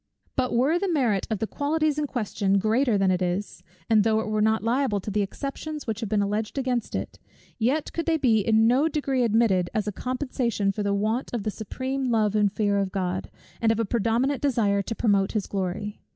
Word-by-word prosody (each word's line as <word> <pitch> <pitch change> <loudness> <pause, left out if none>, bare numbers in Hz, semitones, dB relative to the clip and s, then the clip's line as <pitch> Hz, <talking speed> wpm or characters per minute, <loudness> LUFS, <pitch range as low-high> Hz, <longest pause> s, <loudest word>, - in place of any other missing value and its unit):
But 255 -2 0
were 280 +8 +3
the 385 -1 -1
merit 240 - +1
of 220 - 0
the 220 - -1
qualities 300 +4 0
in 295 - -1
question 205 -6 0
greater 220 +3 +2
than 195 -1 +3
it 180 0 0
is, 180 +3 -2 0.3
and 215 -2 +4
though 220 0 +2
it 220 - -2
were 215 0 0
not 220 0 +2
liable 235 -2 +1
to 205 - -5
the 210 +1 +1
exceptions 280 +8 -5
which 225 -1 -3
have 225 -4 -4
been 205 -1 +2
alleged 210 +5 -2
against 255 -3 -1
it, - - -5 0.4
yet 265 +7 0
could 335 -1 -3
they 325 -1 +3
be 235 -7 +3
in 220 +2 +3
no 255 +7 +4
degree 275 -4 -1
admitted, 220 -6 +2
as 215 -1 0
a - - 0
compensation 250 -3 -1
for 210 - -4
the 200 -1 0
want 220 +5 -1
of 225 - -2
the 215 - -1
supreme 260 +6 -4
love 215 -3 +2
and 205 -2 +3
fear 205 -1 +1
of 195 -1 -1
God, 185 -1 -2 0.3
and 225 -1 +4
of 225 - 0
a 230 - +1
predominant 235 +6 0
desire 220 -8 +2
to 225 +3 -4
promote 200 -4 +2
his 215 -3 -1
glory. 200 +2 -4
220 Hz, 220 wpm, -25 LUFS, 205-260 Hz, 0.4 s, and